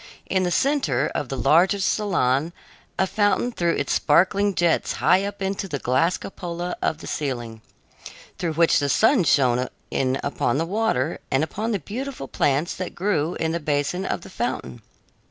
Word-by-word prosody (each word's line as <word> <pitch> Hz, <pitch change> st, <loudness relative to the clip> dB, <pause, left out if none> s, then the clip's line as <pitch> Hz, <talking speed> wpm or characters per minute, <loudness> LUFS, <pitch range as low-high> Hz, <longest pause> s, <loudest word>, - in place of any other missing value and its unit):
In 190 Hz, -, 0 dB
the 180 Hz, -, +1 dB
center 175 Hz, -, +1 dB
of 140 Hz, -, -3 dB
the 135 Hz, -, -3 dB
largest 185 Hz, -, +3 dB
salon 165 Hz, -7 st, 0 dB, 0.4 s
a 190 Hz, -, +3 dB
fountain 205 Hz, +5 st, +1 dB
threw 170 Hz, -6 st, 0 dB
its -, -, -1 dB
sparkling 195 Hz, +5 st, +3 dB
jets 170 Hz, -1 st, +1 dB
high 185 Hz, +2 st, +3 dB
up 200 Hz, 0 st, -5 dB
into 195 Hz, 0 st, -2 dB
the 145 Hz, -, -3 dB
glass 140 Hz, +8 st, +1 dB
cupola 175 Hz, -2 st, -5 dB
of 160 Hz, -, 0 dB
the -, -, -9 dB
ceiling, 120 Hz, -6 st, -4 dB, 0.8 s
through 170 Hz, -3 st, -1 dB
which 165 Hz, +1 st, +4 dB
the 145 Hz, -1 st, 0 dB
sun 225 Hz, -, +4 dB
shone 130 Hz, -4 st, +3 dB, 0.2 s
in 130 Hz, 0 st, 0 dB
upon 140 Hz, -2 st, 0 dB
the 165 Hz, -, 0 dB
water 175 Hz, -, 0 dB
and 135 Hz, +3 st, +2 dB
upon 215 Hz, +8 st, -3 dB
the 210 Hz, -, +1 dB
beautiful 230 Hz, -, -6 dB
plants 145 Hz, +6 st, 0 dB
that 185 Hz, -, -5 dB
grew 175 Hz, -3 st, 0 dB
in 160 Hz, 0 st, -1 dB
the 170 Hz, -, -1 dB
basin 150 Hz, +4 st, -1 dB
of -, -, -2 dB
the -, -, -12 dB
fountain. -, -, -4 dB
170 Hz, 175 wpm, -23 LUFS, 140-195 Hz, 0.8 s, which